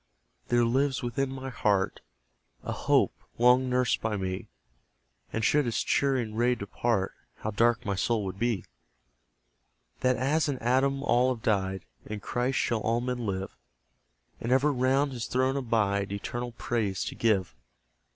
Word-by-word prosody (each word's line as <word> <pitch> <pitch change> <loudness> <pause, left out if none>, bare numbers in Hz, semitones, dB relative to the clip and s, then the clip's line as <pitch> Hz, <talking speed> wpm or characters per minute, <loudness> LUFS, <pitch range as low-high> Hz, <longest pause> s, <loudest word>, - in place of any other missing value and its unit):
there 120 0 +3
lives 130 +3 +1
within 125 +3 -1
my 135 0 -5
heart 100 -5 +1 0.6
A - - -3
hope, - - +2 0.2
long 125 +2 +5
nursed 125 -1 +1
by 110 -2 -1
me; 95 -1 -3 0.8
(And 110 -1 -1
should 145 +1 +3
its 115 - 0
cheering 130 -6 +1
ray 120 +2 +2
depart, 100 -1 -1 0.2
How 110 - -4
dark 115 +3 +2
my 100 - 0
soul 105 +2 0
would 95 0 -5
be!) 115 -5 0 1.3
That 130 0 +2
as 145 +5 +1
in 140 - -1
Adam 135 +3 +1
all 125 -1 +3
have 120 -3 -5
died, 95 -4 0 0.2
In 105 0 -6
Christ 125 +5 -1
shall 115 - +1
all 115 +2 +1
men 125 -2 -3
live; 95 0 -3 0.8
And 115 - -3
ever 140 +3 +4
round 135 +2 +2
his 120 -3 -4
throne 130 +1 +1
abide, 105 -6 0
Eternal 120 +4 -4
praise 110 -5 -1
to - - -4
give. 105 -6 +1
120 Hz, 150 wpm, -28 LUFS, 105-130 Hz, 1.3 s, long